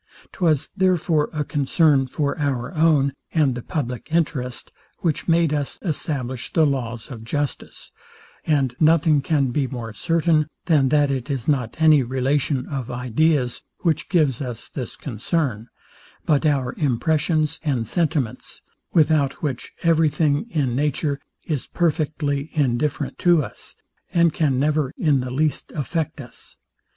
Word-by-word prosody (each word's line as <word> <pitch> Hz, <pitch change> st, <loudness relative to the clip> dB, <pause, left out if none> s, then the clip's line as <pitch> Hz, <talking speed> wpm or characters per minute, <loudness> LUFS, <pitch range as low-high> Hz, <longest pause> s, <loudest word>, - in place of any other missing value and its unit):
Twas 160 Hz, -6 st, +1 dB
therefore 175 Hz, -5 st, +2 dB
a 150 Hz, -1 st, -2 dB
concern 145 Hz, -1 st, +2 dB
for 140 Hz, +2 st, -1 dB
our 135 Hz, -1 st, -1 dB
own, 155 Hz, -4 st, +3 dB, 0.2 s
and 150 Hz, -5 st, +3 dB
the 125 Hz, -, -5 dB
publick 125 Hz, -5 st, -4 dB
interest, 150 Hz, -7 st, -1 dB, 0.3 s
which 165 Hz, -4 st, -1 dB
made 165 Hz, -2 st, +3 dB
us 145 Hz, -2 st, -2 dB
establish 135 Hz, -, -3 dB
the 160 Hz, -, +4 dB
laws 120 Hz, -4 st, -3 dB
of 115 Hz, -3 st, -8 dB
justice; 145 Hz, +5 st, -4 dB, 0.5 s
and 135 Hz, -5 st, +1 dB
nothing 155 Hz, -2 st, +4 dB
can 140 Hz, -4 st, +1 dB
be 135 Hz, +1 st, 0 dB
more 120 Hz, -4 st, -6 dB
certain, 160 Hz, +6 st, +1 dB, 0.2 s
than 145 Hz, -6 st, +3 dB
that 145 Hz, 0 st, +3 dB
it 130 Hz, 0 st, -3 dB
is 135 Hz, -4 st, -3 dB
not 130 Hz, -4 st, 0 dB
any 155 Hz, -3 st, +6 dB
relation 130 Hz, +2 st, 0 dB
of 135 Hz, -5 st, -5 dB
ideas, 125 Hz, +2 st, 0 dB, 0.2 s
which 160 Hz, -4 st, 0 dB
gives 150 Hz, -9 st, +2 dB
us 125 Hz, -4 st, -5 dB
this 130 Hz, -4 st, -6 dB
concern, 125 Hz, -, -2 dB, 0.6 s
but 155 Hz, 0 st, +3 dB
our 135 Hz, -4 st, 0 dB
impressions 155 Hz, +3 st, +1 dB
and 130 Hz, -7 st, -1 dB
sentiments, 155 Hz, -9 st, -2 dB, 0.3 s
without 150 Hz, -4 st, +2 dB
which 135 Hz, -5 st, -3 dB
every 165 Hz, -2 st, +4 dB
thing 150 Hz, +5 st, 0 dB
in 140 Hz, -, 0 dB
nature 145 Hz, 0 st, 0 dB, 0.3 s
is 150 Hz, -6 st, -3 dB
perfectly 150 Hz, -3 st, -1 dB
indifferent 145 Hz, 0 st, -1 dB
to 175 Hz, -4 st, +4 dB
us, -, -, -9 dB, 0.4 s
and 170 Hz, -2 st, +3 dB
can 145 Hz, -5 st, +1 dB
never 150 Hz, -1 st, +1 dB
in 150 Hz, -5 st, +2 dB
the 125 Hz, 0 st, -3 dB
least 150 Hz, +4 st, -1 dB
affect 160 Hz, +1 st, -2 dB
us. 120 Hz, -4 st, -11 dB
145 Hz, 140 wpm, -22 LUFS, 130-155 Hz, 0.6 s, any